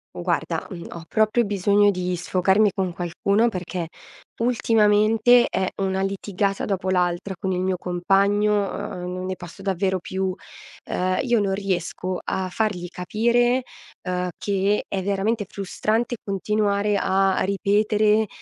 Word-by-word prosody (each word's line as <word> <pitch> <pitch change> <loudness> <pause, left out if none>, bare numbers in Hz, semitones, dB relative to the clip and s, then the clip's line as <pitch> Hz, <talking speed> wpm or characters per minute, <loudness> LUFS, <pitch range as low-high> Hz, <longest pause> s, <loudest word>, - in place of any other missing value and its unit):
Guarda, - - -2
mhmm, 175 -4 -8
ho 170 -1 -8
proprio 220 +2 +2
bisogno 205 +1 +3
di 180 -2 -1
sfocarmi 190 +4 +2
con 190 -2 -1
qualcuno 200 +6 +1
perché 180 -4 -4 0.5
ultimamente 225 0 +4
è 190 -1 0
una 190 0 0
litigata 195 0 -1
dopo 190 -2 -2
l'altra 180 +1 0
con 190 -1 -1
il 180 - -1
mio 185 0 0
compagno, 195 +4 +2 0.2
uhm, 180 0 -5
non 185 0 -4
ne 185 0 -3
posso 175 +2 -11
davvero 190 -1 0
più. 190 +1 -3 0.5
Ehm, 185 0 -1
io 240 -3 +2
non 200 -2 0
riesco 185 -1 -2
a 190 -1 -2
fargli 185 -3 -2
capire, 240 +8 +1 0.5
uhm, 180 0 -1
che 200 +1 0
è 195 - -3
veramente 200 +3 0
frustrante 220 +5 -2
continuare 205 +1 0
a 195 0 +2
ripetere 210 +2 +2
195 Hz, 135 wpm, -23 LUFS, 185-210 Hz, 0.5 s, ultimamente